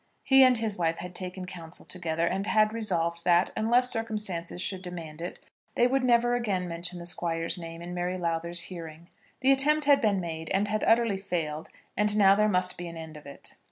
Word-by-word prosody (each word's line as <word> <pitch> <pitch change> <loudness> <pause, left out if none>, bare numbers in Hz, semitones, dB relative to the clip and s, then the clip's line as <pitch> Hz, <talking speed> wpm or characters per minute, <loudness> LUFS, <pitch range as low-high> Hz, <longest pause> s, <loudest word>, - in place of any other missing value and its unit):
He 270 0 +6
and 255 -2 +5
his 220 -2 -2
wife 165 -1 0
had 180 0 -7
taken 185 0 -6
counsel 170 -2 -8
together, 165 -2 -2
and 195 +4 -1
had 215 0 +3
resolved 170 -7 -1
that, 175 0 +3
unless 240 +3 +3
circumstances 210 -7 -3
should 190 0 -2
demand 165 -4 -8
it, 175 - -6 0.4
they 240 - +4
would 265 +1 +1
never 240 -1 +3
again 200 -7 -1
mention 170 +1 -3
the 170 - -8
Squire's 165 -1 -1
name 165 -1 -8
in 175 +1 -7
Mary 180 +1 -2
Lowther's 170 0 -1
hearing. 170 -1 -9 0.3
The 265 +1 +5
attempt 295 +3 +4
had 285 -1 +5
been 205 -3 +2
made 160 -2 -5
and 200 +2 +1
had 215 +1 -1
utterly 225 -3 +3
failed, 160 -5 -3 0.3
and 210 0 +2
now 195 -2 +6
there 210 +1 +2
must 180 -2 0
be 175 - -5
an 170 -1 -8
end 160 -1 -9
of 150 -1 -12
it. 140 - -11
180 Hz, 205 wpm, -28 LUFS, 170-215 Hz, 0.4 s, He